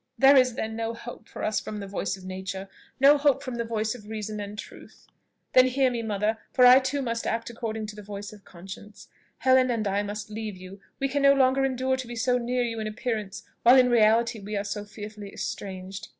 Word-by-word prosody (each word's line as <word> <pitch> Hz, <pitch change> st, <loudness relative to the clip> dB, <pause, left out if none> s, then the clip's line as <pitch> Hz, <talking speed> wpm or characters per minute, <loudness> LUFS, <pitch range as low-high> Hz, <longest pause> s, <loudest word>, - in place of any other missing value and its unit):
"There 270 Hz, +1 st, +7 dB
is, 255 Hz, -3 st, +4 dB
then, 220 Hz, -1 st, -3 dB
no 230 Hz, 0 st, -3 dB
hope 240 Hz, +1 st, -10 dB
for -, -, -7 dB
us 215 Hz, 0 st, +1 dB
from 210 Hz, -, -6 dB
the 200 Hz, -, -5 dB
voice 195 Hz, 0 st, -3 dB
of 185 Hz, -, -13 dB
nature, 190 Hz, +1 st, -5 dB, 0.3 s
no 285 Hz, +2 st, +6 dB
hope 280 Hz, -2 st, +2 dB
from 255 Hz, -2 st, -5 dB
the 235 Hz, -, -1 dB
voice 220 Hz, -1 st, -2 dB
of 215 Hz, -4 st, -12 dB
reason 215 Hz, -1 st, -5 dB
and 205 Hz, 0 st, -6 dB
of -, -, -11 dB
truth? -, -, -11 dB, 0.5 s
Then 255 Hz, 0 st, +7 dB
hear 260 Hz, 0 st, +2 dB
me, 235 Hz, -1 st, -2 dB
mother, 215 Hz, 0 st, -1 dB
for 250 Hz, -, +5 dB
I 250 Hz, +1 st, +9 dB
too 270 Hz, +1 st, -2 dB
must 230 Hz, -2 st, -2 dB
act 230 Hz, +1 st, -2 dB
according 220 Hz, -2 st, -4 dB
to 210 Hz, 0 st, -8 dB
the 210 Hz, -, -9 dB
voice 205 Hz, 0 st, -8 dB
of 205 Hz, -1 st, -15 dB
conscience. 195 Hz, +4 st, -12 dB, 0.3 s
Helen 260 Hz, +1 st, +4 dB
and 225 Hz, -3 st, 0 dB
I 200 Hz, +1 st, +1 dB
must 205 Hz, +1 st, -6 dB
leave 215 Hz, -2 st, -5 dB
you; 185 Hz, +2 st, -11 dB, 0.2 s
we 275 Hz, -, +1 dB
can 280 Hz, +1 st, -1 dB
no 275 Hz, 0 st, +7 dB
longer 265 Hz, 0 st, +3 dB
endure 260 Hz, 0 st, 0 dB
to 260 Hz, -2 st, -6 dB
be 240 Hz, -, -7 dB
so 250 Hz, +2 st, +1 dB
near 245 Hz, +1 st, 0 dB
you 230 Hz, -2 st, -3 dB
in 215 Hz, -, -3 dB
appearance, 215 Hz, -2 st, -4 dB, 0.2 s
while 245 Hz, +3 st, +7 dB
in 250 Hz, -1 st, +5 dB
reality 230 Hz, 0 st, +3 dB
we 205 Hz, +1 st, -4 dB
are 200 Hz, -, -1 dB
so 205 Hz, +1 st, -4 dB
fearfully 210 Hz, 0 st, -9 dB
estranged. 190 Hz, 0 st, -6 dB
220 Hz, 235 wpm, -26 LUFS, 205-250 Hz, 0.5 s, I